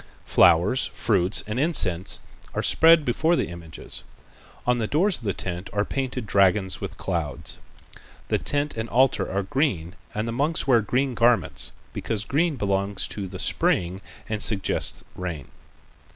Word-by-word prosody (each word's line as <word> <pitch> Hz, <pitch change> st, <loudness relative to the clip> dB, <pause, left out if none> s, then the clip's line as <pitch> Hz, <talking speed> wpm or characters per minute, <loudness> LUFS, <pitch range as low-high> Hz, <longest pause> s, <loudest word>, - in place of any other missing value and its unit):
Flowers, 90 Hz, +9 st, +4 dB
fruits 90 Hz, +2 st, +2 dB
and 110 Hz, +4 st, -3 dB
incense 100 Hz, -, +1 dB, 0.4 s
are -, -, -1 dB
spread 165 Hz, -1 st, +5 dB
before 160 Hz, +8 st, +2 dB
the -, -, -1 dB
images. 85 Hz, -2 st, -8 dB, 0.6 s
On 125 Hz, 0 st, +2 dB
the 110 Hz, -, -1 dB
doors 180 Hz, -, +1 dB
of 120 Hz, -, -12 dB
the 100 Hz, -, +1 dB
tent 90 Hz, 0 st, -5 dB
are 105 Hz, 0 st, +1 dB
painted 130 Hz, -3 st, -3 dB
dragons 95 Hz, -1 st, +2 dB
with -, -, -6 dB
clouds. 85 Hz, -7 st, -3 dB, 0.7 s
The -, -, +1 dB
tent 145 Hz, 0 st, -1 dB
and 110 Hz, 0 st, -4 dB
altar 130 Hz, +2 st, +2 dB
are 100 Hz, +1 st, -1 dB
green 95 Hz, -, -1 dB, 0.2 s
and 105 Hz, +2 st, -2 dB
the -, -, -2 dB
monks 145 Hz, +7 st, 0 dB
wear 125 Hz, -4 st, +4 dB
green 125 Hz, +5 st, 0 dB
garments, 120 Hz, 0 st, +2 dB, 0.2 s
because 105 Hz, -2 st, -3 dB
green 160 Hz, +2 st, +1 dB
belongs 100 Hz, -3 st, -1 dB
to 100 Hz, -2 st, -5 dB
the 95 Hz, 0 st, -8 dB
spring 90 Hz, +1 st, 0 dB, 0.3 s
and 110 Hz, -1 st, -3 dB
suggests 105 Hz, -2 st, +1 dB
rain. 85 Hz, -6 st, -6 dB
105 Hz, 150 wpm, -24 LUFS, 95-130 Hz, 0.7 s, spread